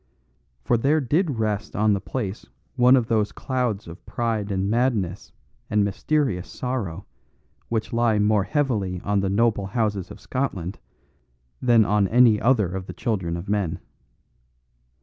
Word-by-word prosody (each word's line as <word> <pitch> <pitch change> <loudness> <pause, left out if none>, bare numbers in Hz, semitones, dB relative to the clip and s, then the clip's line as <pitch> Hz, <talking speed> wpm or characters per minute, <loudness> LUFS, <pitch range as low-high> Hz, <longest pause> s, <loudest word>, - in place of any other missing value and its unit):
For 120 - +2
there 140 +7 +2
did 145 +1 0
rest 105 -2 -2
on 105 0 +3
the 100 - -1
place 105 -5 -5 0.3
one 125 0 +6
of 125 -3 +2
those 110 -3 +1
clouds 125 -7 -2
of 85 +2 -11
pride 110 -3 -2
and 95 0 0
madness 110 -5 0 0.4
and 105 -1 +2
mysterious 100 -2 -1
sorrow 105 -8 -4 0.6
which 110 -1 -2
lie 115 -2 +2
more 105 -1 +2
heavily 110 - -1
on 100 0 0
the 95 0 0
noble 105 -1 +1
houses 105 -3 -1
of - - -10
Scotland 100 -9 -3 0.8
than 120 -3 +5
on 105 -1 +2
any 115 -1 +5
other 110 -7 +2
of 95 0 -5
the - - -6
children 95 -8 -2
of 85 +4 -7
men. 100 -5 -1
105 Hz, 150 wpm, -24 LUFS, 100-120 Hz, 0.8 s, one